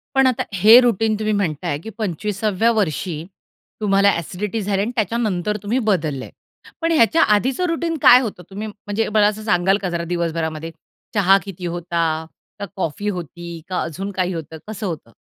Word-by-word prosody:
पण 270 -1 +5
आता 255 - +1
हे 215 +6 +8
रुटीन 225 -2 +2
तुम्ही 215 0 0
म्हणताय 170 -6 -1
की - - -6
25 210 0 -3 0.2
व्या 230 +1 +5
वर्षी 170 -5 -1 0.6
तुम्हाला 200 -1 +4
अ‍ॅसिडिटी 190 +5 -3
झाल्या 200 0 0
आणि 225 - -2
त्याच्यानंतर 210 -3 0
तुम्ही 225 +5 0
बदलले. 155 -9 -1 0.5
पण 330 - +1
ह्याच्या 320 +2 +4
आधीचं 260 - 0
रुटीन 330 0 -1
काय 250 - +9
होतं 200 -7 -5
तुम्ही 205 +3 -5
म्हणजे 210 +1 -3
मला 210 -1 +5
असं 215 +1 -3
सांगाल 190 -1 +2
का 185 - -2
जरा 170 -1 -2
दिवसभरामध्ये 165 -1 -2 0.4
चहा 195 -2 +5
किती 185 -2 -8
होता 170 -1 -1 0.5
का 200 - -3
कॉफी 190 +3 -2
होती 170 -2 -6
का 185 - -1
अजून 190 +5 -4
काही 185 -1 -1
होतं 160 -1 -6
कसं 215 0 -5
होतं? 155 -9 -6
195 Hz, 170 wpm, -20 LUFS, 170-220 Hz, 0.6 s, काय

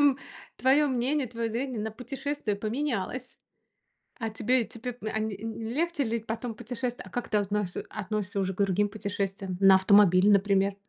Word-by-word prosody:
м, 285 -2 +5 0.4
твоё 275 +3 +4
мнение, 260 +2 0
твоё 230 0 -3
зрение 240 0 -2
на 220 +1 -2
путешествие 250 -1 -3
поменялось. 245 +1 -3 0.8
А 225 -2 -2
тебе, 240 +3 +1
тебе 240 +2 -7
а 215 0 -2
ни 215 -2 -2
не 225 +1 -4
легче 330 -1 0
ли 230 0 -1
потом 225 +1 -4
путешествовать? 245 +2 -4
А - - -11
как 245 - -4
ты 210 - +2
относис 205 -2 -1
относишься 210 -1 -3
уже 190 0 0
к - - -17
другим 200 +1 +1
путешествиям? 195 -3 -3
На 195 -1 +8
автомобиле, 190 0 +6
например? 195 0 +3
220 Hz, 165 wpm, -28 LUFS, 200-250 Hz, 0.8 s, На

